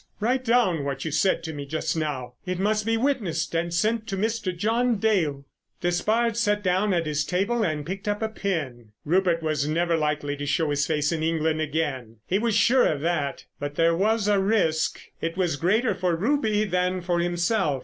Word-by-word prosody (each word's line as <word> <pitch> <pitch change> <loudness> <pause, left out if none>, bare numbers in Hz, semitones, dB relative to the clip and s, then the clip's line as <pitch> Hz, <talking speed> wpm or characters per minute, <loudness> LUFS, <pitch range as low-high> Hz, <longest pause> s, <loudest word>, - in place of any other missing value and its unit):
Write 250 +5 +1
down 225 - +2
what 140 0 -3
you 160 - -2
said 170 +3 +1
to 160 -1 -5
me 145 -1 -5
just 155 +4 -2
now. 140 -6 -3
It 185 0 -3
must 210 +3 0
be 225 0 +2
witnessed 215 - -1
and 170 +1 -1
sent 215 +6 0
to 195 - -3
Mr. 220 -1 -1
John 230 +4 +1
Dale." 170 -11 0 0.4
Despard 215 +6 +1
sat 210 -2 +1
down 190 +3 +2
at 170 -2 +1
his 150 -1 0
table 200 +9 0
and 155 -7 -1
picked 195 +4 -6
up 205 +1 -1
a - - +1
pen. 145 - -4
Rupert 170 0 +2
was 155 -2 0
never 170 +2 +1
likely 150 -2 -1
to 145 - -4
show 150 +1 +1
his 145 0 +1
face 150 -1 0
in 165 -2 -2
England 160 -1 0
again, 145 -7 -2
he 195 - +1
was 225 -1 0
sure 245 +4 +4
of 145 -2 -1
that. 155 -4 -1
But 145 0 -4
there 165 +1 +3
was 210 +3 +1
a 205 -1 +3
risk. 190 -6 +1 0.2
It 165 +2 -3
was 175 -5 +1
greater 210 - +2
for 180 -2 0
Ruby 215 - +1
than 180 -2 0
for 175 0 0
himself. 175 -3 0
175 Hz, 200 wpm, -25 LUFS, 155-210 Hz, 0.4 s, sure